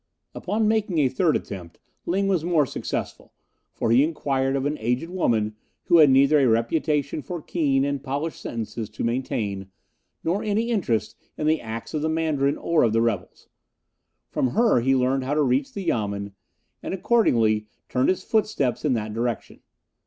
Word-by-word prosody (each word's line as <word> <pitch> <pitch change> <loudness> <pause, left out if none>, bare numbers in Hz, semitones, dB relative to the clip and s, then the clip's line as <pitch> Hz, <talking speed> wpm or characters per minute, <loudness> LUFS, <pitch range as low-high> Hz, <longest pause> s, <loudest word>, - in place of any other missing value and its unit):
Upon 215 +1 -1
making 210 -5 +1
a 140 -4 +3
third 155 +5 +1
attempt 90 -4 -6 0.3
Ling 195 +3 +1
was 185 -5 +1
more 165 -4 +2
successful, - - -5 0.4
for 115 - -1
he 125 +4 +6
inquired 135 -4 0
of 135 0 -1
an 145 +1 0
aged 125 +9 -1
woman, 110 -12 0 0.3
who 175 -2 +4
had 150 -3 +8
neither 140 +3 +5
a 135 - +4
reputation 140 +6 0
for 175 +3 -6
keen 140 -4 0
and 140 -1 -2
polished 145 +4 -3
sentences 115 -1 -5
to - - -6
maintain, 110 -5 -2 0.5
nor 180 +5 0
any 220 +3 0
interest 155 - 0 0.2
in 150 - -2
the 155 0 +2
acts 115 0 -7
of 155 - -1
the 160 - 0
Mandarin 155 -3 0
or 170 -2 +1
of 115 -2 +3
the 115 - +3
rebels. 105 -6 -3 0.8
From - - +1
her 230 - +4
he 135 +3 +2
learned 130 +1 +1
how 140 +3 -1
to 150 - +3
reach 130 +1 +1
the 200 - -5
Yamen, 100 -7 -2 0.5
and - - -3
accordingly 115 - +2 0.2
turned 125 0 +1
his 185 0 0
footsteps 210 - 0
in 150 -4 +2
that 110 -2 -3
direction. 120 +1 -3
140 Hz, 175 wpm, -24 LUFS, 115-165 Hz, 0.8 s, had